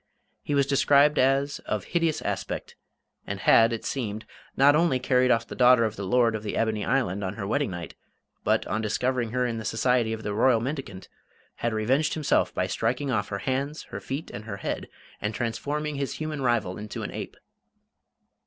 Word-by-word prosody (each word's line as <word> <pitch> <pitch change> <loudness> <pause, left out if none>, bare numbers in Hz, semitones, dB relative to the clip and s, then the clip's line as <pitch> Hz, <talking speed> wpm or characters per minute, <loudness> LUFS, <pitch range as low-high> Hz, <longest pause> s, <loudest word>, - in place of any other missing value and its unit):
He 145 - -2
was 140 -1 +4
described 140 +2 +4
as 135 +2 +2
"of - - -1
hideous 165 -3 0
aspect," - - -4 0.5
and - - -4
had, 115 +1 +6
it 115 - -4
seemed, 110 -5 -3 0.3
not 140 +2 +6
only 165 -4 +3
carried 125 0 +2
off 115 -1 +3
the - - -9
daughter 125 -2 +5
of 110 -1 -3
the 100 -2 -5
Lord 120 +1 +3
of 110 - -3
the 105 - -4
Ebony 110 -2 0
Island 100 -7 0
on 95 +1 -3
her 100 - -4
wedding 140 +5 0
night, 85 -3 -6 0.5
but, - - +2
on 110 - -2
discovering 120 +2 0
her 125 +2 0
in 115 -2 -2
the - - -6
society 115 +1 +1
of 110 0 -4
the 105 - -2
Royal 115 +2 +4
Mendicant, 125 -7 -5 0.5
had 120 - -1
revenged 130 +8 +1
himself 155 -3 +1
by - - -1
striking 130 +4 -1
off 105 -4 0
her 100 - -3
hands, 140 +4 -2
her - - -4
feet, 135 +4 -5
and 105 +2 -8
her 105 -3 -5
head, - - -4 0.3
and 105 +1 -2
transforming 145 +6 -2
his 140 -1 -2
human 155 -2 -4
rival 110 -7 0
into 105 0 -6
an - - -5
ape. - - -7
125 Hz, 195 wpm, -26 LUFS, 110-140 Hz, 0.5 s, had